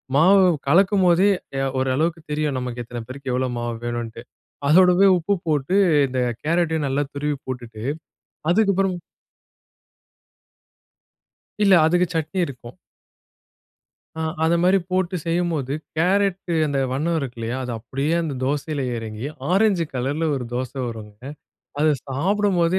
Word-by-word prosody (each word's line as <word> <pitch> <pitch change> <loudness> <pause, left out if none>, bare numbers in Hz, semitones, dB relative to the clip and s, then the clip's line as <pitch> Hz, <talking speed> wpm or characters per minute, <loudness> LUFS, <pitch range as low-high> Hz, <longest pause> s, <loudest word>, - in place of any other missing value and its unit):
மாவு 190 +6 +6 0.2
கலக்கும்போதே, 185 +2 +4 0.3
ய 135 - 0 0.2
ஓரளவுக்கு 155 +6 0
தெரியும் 150 -3 -1
நமக்கு. 125 -1 -4
எத்தன 120 0 -6
பேருக்கு, 130 0 -6
எவ்வளோ 130 0 0
மாவு 120 0 -3
வேணுன்ட்டு! 120 -1 -4 0.5
அதோடவே 180 +4 +6
உப்பு 195 +4 0
போட்டு, 155 +5 +1 0.3
இந்த 130 0 -3 0.2
கேரட்டையும் 160 -2 +1
நல்லா 140 +2 0
துருவி 145 0 -2
போட்டுட்டு, 120 -4 -6 0.7
அதுக்கப்புறம் 195 -2 +2 2.7
இல்ல, 200 - +5
அதுக்கு 175 +2 +3
சட்னி 160 +4 -1
இருக்கும். 125 -3 -10 1.4
ஆ. - - -3 0.2
அத 165 +1 +3
மாரி 185 +2 +4
போட்டு 185 0 0
செய்யும்போது, 165 -6 -1 0.2
கேரட்டு 190 0 +1
அந்த 145 -2 -1
வண்ணம் 160 +5 0
இருக்கு 130 -4 -5
இல்லையா? 115 +2 -3
அது 125 - -4
அப்டியே 135 +7 -2
அந்த 155 -4 -3
தோசையில 145 +1 -2 0.2
எறங்கி, 110 +3 -6 0.2
ஆரஞ்சு 195 -3 +3
கலரில 140 +6 -1
ஒரு 130 - -4
தோசை 130 +2 -4
வரும்ங்க. 105 -2 -9 0.6
அதை 155 0 +4 0.2
சாப்பிடும்போதே, 185 +4 +1
155 Hz, 120 wpm, -22 LUFS, 130-180 Hz, 2.7 s, மாவு